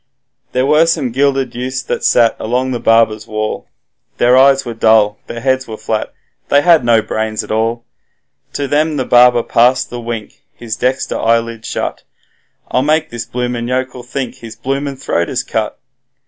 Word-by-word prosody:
There 125 +1 +1
were 150 +3 +4
some 135 -7 0
gilded 135 -1 0
youths 125 +1 -4
that - - -3
sat 115 -1 +3
along 125 +3 -1
the 120 - -2
barber's 115 -1 +2
wall, 110 -1 -3 0.5
Their 125 +1 +4
eyes 135 +1 +5
were 120 - -4
dull, 110 -2 +3
their 115 - -6
heads 130 0 0
were 110 -1 -7
flat, 110 0 -3 0.4
they 145 0 +4
had 170 -5 +5
no 115 -2 +3
brains 110 0 -2
at - - -9
all; 115 +2 -1 0.7
To 140 - -2
them 150 +2 +1
the 130 - -1
barber 120 -1 +5
passed 125 +2 +2
the 120 0 -5
wink, 115 -2 -6
his 115 -2 -5
dexter 130 +3 -1
eyelid 115 0 0
shut, - - -3 0.7
'I'll 125 - +2
make 155 +2 +1
this 120 -1 -5
bloomin' 120 -1 -3
yokel 130 0 -2
think 125 +1 -5
his 115 -1 -10
bloomin' 135 +3 -3
throat 85 -10 -1
is - - -2
cut.' - - -3
125 Hz, 175 wpm, -15 LUFS, 115-135 Hz, 0.7 s, eyes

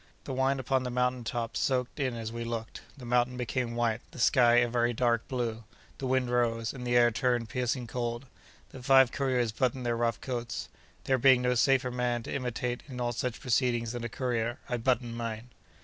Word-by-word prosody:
The 135 - -5
wine 135 +1 +1
upon 130 +1 +1
the 125 - -3
mountain 125 0 0
top 115 0 -3
soaked 130 +1 -1
in 130 -3 0
as 115 -1 -5
we 115 0 -4
looked; 115 -1 -5 0.2
the 130 - -10
mountain 125 +1 +1
became 120 0 -2
white; 120 -1 0
the - - -14
sky, 120 0 +5
a 120 0 +5
very 120 0 +1
dark 120 0 +1
blue; 115 -3 -3 0.4
the 135 - -3
wind 130 -1 +1
rose; 115 -2 0
and 125 -2 -6
the 120 - +1
air 120 0 +5
turned 120 -1 0
piercing 125 +1 -1
cold. 120 +1 -3 0.5
The 130 - -10
five 135 -1 +6
couriers 125 -4 0
buttoned 125 +2 -1
their 120 -1 +1
rough 115 -2 0
coats. 120 -2 -4 0.3
There 130 -1 +1
being 130 0 +5
no 125 0 +2
safer 130 0 +3
man 120 -1 -1
to - - -6
imitate 125 -2 -2
in 130 -3 -7
all 120 -1 0
such 120 0 -3
proceedings 120 -2 +1
than 120 -1 -5
a 120 - -3
courier, 120 -1 -2
I 125 - -1
buttoned 120 -1 0
mine. 115 +1 -5
120 Hz, 205 wpm, -29 LUFS, 115-125 Hz, 0.5 s, five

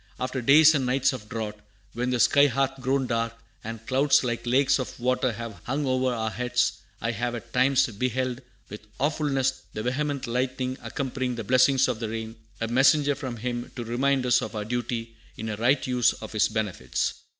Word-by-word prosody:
"After 130 +1 -2
days 150 +5 +7
and 140 -3 +1
nights 130 +2 +2
of 105 -4 -8
drought, 105 -2 -4 0.3
when 125 +2 -2
the 125 -1 0
sky 140 +4 +5
hath 135 0 -1
grown 135 +1 +1
dark, 115 -1 -1 0.3
and 115 0 -7
clouds 135 +3 +3
like 120 -1 -3
lakes 135 +3 +3
of 130 - -5
water 125 0 +1
have 115 -1 -7
hung 140 +4 -1
over 130 -1 +1
our 110 -2 -2
heads, 125 -4 0 0.2
I 115 - -1
have 120 +2 -2
at 115 0 -9
times 130 +1 +4
beheld 125 +2 -2 0.3
with 105 +1 -10
awfulness 140 -3 0
the 110 - -4
vehement 140 +2 -1
lightning 130 +1 -2
accompanying 130 -2 -3
the 115 - -4
blessings 130 +3 +4
of 125 -4 -2
the 115 -2 -3
rain, 110 0 -5 0.2
a 115 - -1
messenger 140 +4 +4
from 130 -3 -6
Him 120 +1 -4
to 120 - -4
remind 130 +3 +1
us 125 - +4
of - - -5
our 105 -1 -3
duty 115 0 -3 0.2
in 110 - -4
a 105 - -2
right 125 +5 +2
use 125 -3 +2
of 110 - -9
His 110 -2 +2
benefits." 105 - -2
125 Hz, 195 wpm, -26 LUFS, 115-135 Hz, 0.3 s, days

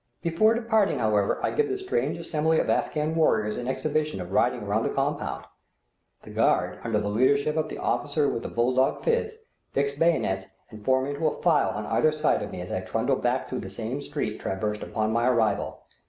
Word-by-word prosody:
Before 200 +7 +3
departing, 220 -3 +2
however, 105 -3 +1
I - - +1
give 445 -1 +1
the 390 - -1
strange 390 +5 -1
assembly 160 0 +1
of - - +1
Afghan 155 +1 0
warriors 110 -10 +2
an 125 - -4
exhibition 150 0 -1
of 90 0 -6
riding 120 +2 +2
around 105 +2 0
the - - 0
compound. 135 - -2 0.8
The - - -11
guard, - - +1
under 115 -2 0
the 105 - -1
leadership 140 +7 +2
of 155 -1 0
the - - -6
officer 145 0 0
with 115 - -1
the - - -5
bull 120 +2 +1
dog 130 +1 +1
phiz, 465 -1 0 0.4
fix 140 0 +1
bayonets 140 - +1 0.2
and 105 -2 -11
form 130 +2 +2
into 145 +3 -1
a - - -3
file - - +4
on - - -4
either 155 - +2
side 155 0 +1
of - - -4
me 90 - -6
as 90 - -7
I - - -1
trundle 115 +8 0
back 125 +2 0
through 130 - -4
the 95 - -6
same 115 +8 -4
street 140 -7 -4
traversed 105 +2 -2
upon 110 0 -1
my 120 +1 +2
arrival. 110 -5 0
130 Hz, 205 wpm, -26 LUFS, 110-155 Hz, 0.8 s, file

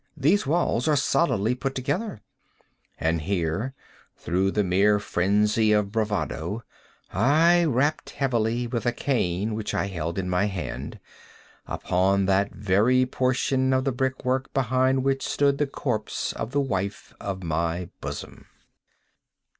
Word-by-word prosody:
—these 155 +4 +2
walls 155 -5 +1
are 155 - +4
solidly 125 -5 +2
put 135 +2 -3
together;" 155 - -2 0.8
and 80 0 0
here, 95 - -2 0.4
through 95 +3 0
the 105 +1 +1
mere 100 +3 +3
phrenzy 105 +3 +2
of 105 -1 +2
bravado, 105 -2 -2 0.5
I 160 - +4
rapped 145 +2 +1
heavily, 120 -3 0
with 120 0 -3
a 120 - +2
cane 110 -6 -1
which 105 -1 -3
I 100 - +1
held 85 -3 -4
in 95 -1 -2
my 90 +2 +1
hand, 95 -4 -5 0.7
upon 95 +2 +1
that 100 +1 +2
very 105 +7 +3
portion 130 +1 +1
of 130 0 +2
the 135 - 0
brick 130 +1 -2
work 130 +1 0
behind 130 0 +2
which 135 0 +1
stood 140 -1 +2
the 145 - +2
corpse 120 -6 -2
of 110 - -4
the 140 +2 +1
wife 100 -6 -3
of 95 -1 -4
my 85 +2 -1
bosom. - - -7
110 Hz, 140 wpm, -25 LUFS, 95-130 Hz, 0.8 s, are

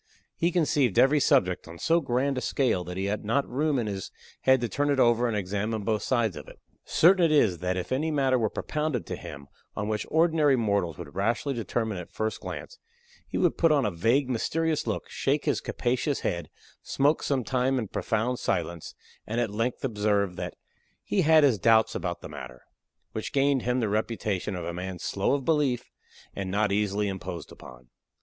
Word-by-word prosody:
He 170 +1 +1
conceived 145 - +1
every 145 +3 +5
subject 130 - +2
on 85 0 -10
so 165 - +2
grand 135 +1 0
a 130 - -2
scale 125 -11 +1
that 90 +1 -6
he 95 - -1
had 100 +1 -2
not 125 +7 0
room 145 +3 0
in 120 - 0
his 100 -3 -4 0.3
head 130 0 +4
to 120 - 0
turn 145 +4 -1
it 140 -2 +2
over 120 0 +4
and 110 -3 -1
examine 105 +3 -2
both 110 0 0
sides 115 -8 0
of - - -9
it. - - -13 0.3
Certain 180 +2 +5
it 165 - +4
is 110 - +3
that, 90 +1 -1
if 90 -1 -4
any 145 +5 0
matter 135 -4 +2
were 110 -2 +1
propounded 150 -2 -2
to - - -4
him 70 0 -9 0.3
on 105 - -3
which 105 -1 -2
ordinary 160 -3 +3
mortals 100 - 0
would 75 - -9
rashly 115 +9 0
determine 110 -4 -2
at 90 - -9
first 110 0 -3
glance, - - -7 0.5
he - - -4
would - - +1
put 165 -2 +4
on 145 -3 +3
a 105 - 0
vague, 115 +11 +2
mysterious 155 +6 -1
look, - - -2
shake 145 +2 -1
his - - +1
capacious 130 +3 -1
head, 85 -3 -2 0.3
smoke 145 +3 +1
some 135 -3 0
time 130 +2 +1
in 115 -4 -2
profound 115 +5 -1
silence, 85 -1 -2 0.3
and 115 +2 -1
at 115 -4 0
length 115 +5 -2
observe 105 -5 0
that 90 -1 -5 0.5
"he 195 - +1
had 160 -1 +5
his 130 -8 +4
doubts 110 0 +4
about 85 -2 -3
the - - -7
matter"; 65 -4 -10 0.5
which 110 - -5
gained 140 -1 +2
him 125 +2 0
the 115 - 0
reputation 105 -2 -2
of 90 -2 -5
a 85 - -4
man 90 +1 -5
slow 100 +8 0
of 135 -2 -4
belief 145 -7 +1 0.4
and 95 -1 -4
not 105 +1 +1
easily 105 0 0
imposed 95 -4 -6
upon. 60 -1 -13
115 Hz, 200 wpm, -27 LUFS, 100-140 Hz, 0.5 s, every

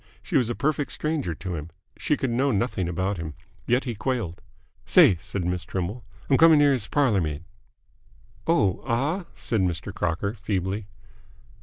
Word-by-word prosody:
She - - -4
was 120 -3 +3
a 120 - -1
perfect 150 -1 0
stranger 150 - -1
to 95 +2 -5
him. 80 -1 -5 0.3
She 150 - 0
could 130 -4 -1
know 135 +4 +2
nothing 100 -5 0
about 95 +3 -1
him. 80 -3 -6 0.3
Yet 125 +2 +3
he 120 - -3
quailed. 110 -6 -3 0.4
"Say," 90 - +6
said 95 -3 -4
Miss 90 -1 -1
Trimble. 95 +6 -4 0.2
"I'm 135 - +3
c'ming 160 -2 +7
here 145 -1 +5
's 110 -5 -3
parlour 130 -10 +2
maid." 75 -1 -3 1.0
"Oh, 105 - +2
ah?" 145 +10 0
said 110 -4 -1
Mr. 90 -1 -2
Crocker, 90 +4 -1
feebly. 100 -1 -2
105 Hz, 165 wpm, -25 LUFS, 90-135 Hz, 1.0 s, c'ming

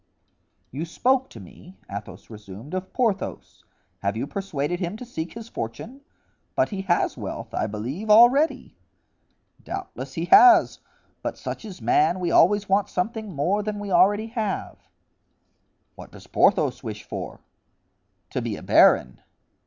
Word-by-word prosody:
"You 145 +5 -4
spoke 255 +10 0
to 115 - -12
me," 170 - -14
Athos 100 +3 -9
resumed, 105 - -11
"of 185 0 -4
Porthos; 225 -6 -2 0.4
have 100 +2 -2
you 120 - -2
persuaded 175 -1 -3
him 185 +3 -3
to 250 - -9
seek 170 -8 -6
his 230 -1 -9
fortune? 220 - -7 0.5
But - - +2
he 195 -3 -4
has 175 - +1
wealth, - - -6
I 110 - -1
believe, 125 - -5
already." 240 +8 +5 0.9
"Doubtless 370 - -7
he 165 - -2
has. 350 - +7 0.4
But - - -4
such - - -6
is 185 - -10
man, 155 +9 +2
we 175 -2 -1
always 205 +3 +4
want 195 +1 +1
something 215 +3 -3
more 185 +9 +1
than 210 0 -4
we 205 -1 -6
already 205 +4 +4
have." 220 -4 -4 1.1
"What - - -13
does - - -14
Porthos - - +2
wish - - -7
for?" - - -7 0.9
"To - - -2
be - - -3
a - - -10
baron." 60 0 +4
190 Hz, 145 wpm, -24 LUFS, 140-220 Hz, 1.1 s, has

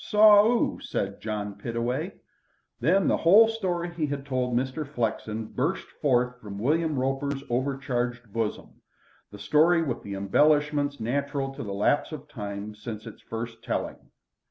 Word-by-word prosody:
"Saw 210 -1 +7
'oo?" 240 0 +1
said 100 0 -3
John 105 -2 -3
Pittaway. 115 +3 -2 0.7
Then 180 +10 +3
the - - +3
whole 205 +7 +7
story 180 -6 -2
he 160 -3 -1
had 140 -1 -4
told 125 -3 0
Mr. 130 +4 -1
Flexen 110 -5 -3
burst - - -2 0.2
forth 125 -2 +1
from 100 -2 -8
William 155 +6 +1
Roper's 135 +1 -1
overcharged 125 -3 -2
bosom, 115 -2 -3 0.5
the 105 - -11
story 155 - +3
with 130 -7 -3
the 100 -1 -6
embellishments 145 +7 +2
natural 135 +3 -2
to - - -7
the 100 - -5
lapse 105 +11 +1
of 150 -1 -8
time 105 -4 -6
since 105 0 -7
its - - -10
first 115 0 -6
telling. - - -4
130 Hz, 150 wpm, -27 LUFS, 115-150 Hz, 0.7 s, Saw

